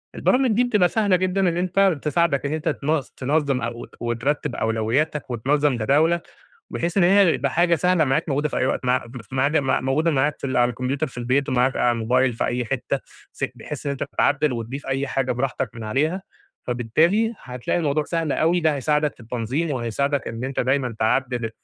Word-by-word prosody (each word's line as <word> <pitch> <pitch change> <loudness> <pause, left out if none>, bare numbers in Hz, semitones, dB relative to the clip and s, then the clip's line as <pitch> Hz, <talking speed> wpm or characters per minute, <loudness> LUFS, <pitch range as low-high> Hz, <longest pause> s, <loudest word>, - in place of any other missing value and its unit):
البرامج 255 -1 +2
دي 230 +4 +3
بتبقى 210 -7 +3
سهلة 205 -2 +2
جدًا 185 +1 0
إن 170 - -3
أنت 185 -2 +2
تساعدك 155 -3 +1
إن 140 - -1
أنت 155 +1 -1
تن 150 +1 0 0.2
تنظّم 140 -1 0
أو 120 0 -5
وترّتب 120 +3 -2
أولوياتك 115 +7 -1
وتنظّم 140 +3 +1
جداولك، 155 +9 +2 0.4
بحيث 170 +2 -3
إن - - +5
هي 190 -1 +5
تبقى 140 +2 -1
حاجة 170 +4 +3
سهلة 180 0 +2
معاك 145 +4 0
موجودة 145 +1 0
في - - -4
أي - - +1
وقت 130 - -1
مع 125 0 +1
مف 115 -3 -9 0.4
مع 130 - +1
موجودة 150 +6 +1
معاك 145 +1 +1
في - - -3
ال 130 - -2
على 120 0 +4
الكمبيوتر 130 +5 -2
في 125 - -10
البيت 130 +3 0
ومعاك 130 +1 +2
على 120 - +3
الموبايل 125 +3 +1
في 115 - -2
أي 125 0 -1
حتة، 110 - -2 0.3
فت - - -4
بحيث 150 0 -7
إن - - 0
أنت 140 - -3
تعدِّل 145 0 +2
وتضيف 120 +4 -5
أي 135 +1 -1
حاجة 135 -1 -1
براحتك 130 -1 -2
من 115 -2 -7
عليها، 155 - 0 0.4
فبالتالي 160 - +1
هتلاقي 125 +5 -3
الموضوع 150 -2 0
سهل 165 -3 -1
أوي، 170 +2 +2
ده 155 -2 +2
هيساعدك 150 +1 0
في - - -21
التنظيم 125 +7 -2
وهيساعدك 140 +3 -1
إن 115 +2 -5
أنت 135 +1 -2
دايمًا 130 -2 0
تعدِّل 120 0 0
140 Hz, 195 wpm, -23 LUFS, 125-160 Hz, 0.4 s, إن